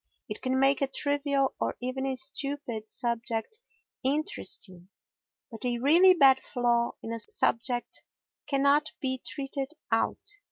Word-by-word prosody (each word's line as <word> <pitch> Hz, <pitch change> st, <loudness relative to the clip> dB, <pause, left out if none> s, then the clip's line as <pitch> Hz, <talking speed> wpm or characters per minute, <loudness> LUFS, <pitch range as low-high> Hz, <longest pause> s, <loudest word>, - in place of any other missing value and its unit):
It -, -, -7 dB
can 260 Hz, 0 st, 0 dB
make 275 Hz, +1 st, +3 dB
a 275 Hz, -, +2 dB
trivial, 280 Hz, -1 st, 0 dB
or -, -, -1 dB
even 255 Hz, +2 st, -3 dB
a 265 Hz, -, -1 dB
stupid, 265 Hz, -4 st, -2 dB
subject 235 Hz, -, -1 dB, 0.4 s
interesting, 260 Hz, -, -2 dB, 0.6 s
but 225 Hz, -, -9 dB
a 245 Hz, -1 st, 0 dB
really 340 Hz, +9 st, +6 dB
bad 270 Hz, -5 st, +6 dB
flaw 240 Hz, -2 st, 0 dB
in 225 Hz, -, -4 dB
a 230 Hz, -, -4 dB
subject 240 Hz, +2 st, 0 dB, 0.5 s
cannot 280 Hz, +2 st, +2 dB
be 260 Hz, -2 st, -2 dB
treated 275 Hz, +1 st, -4 dB, 0.2 s
out. 410 Hz, -, 0 dB
265 Hz, 130 wpm, -28 LUFS, 240-285 Hz, 0.6 s, really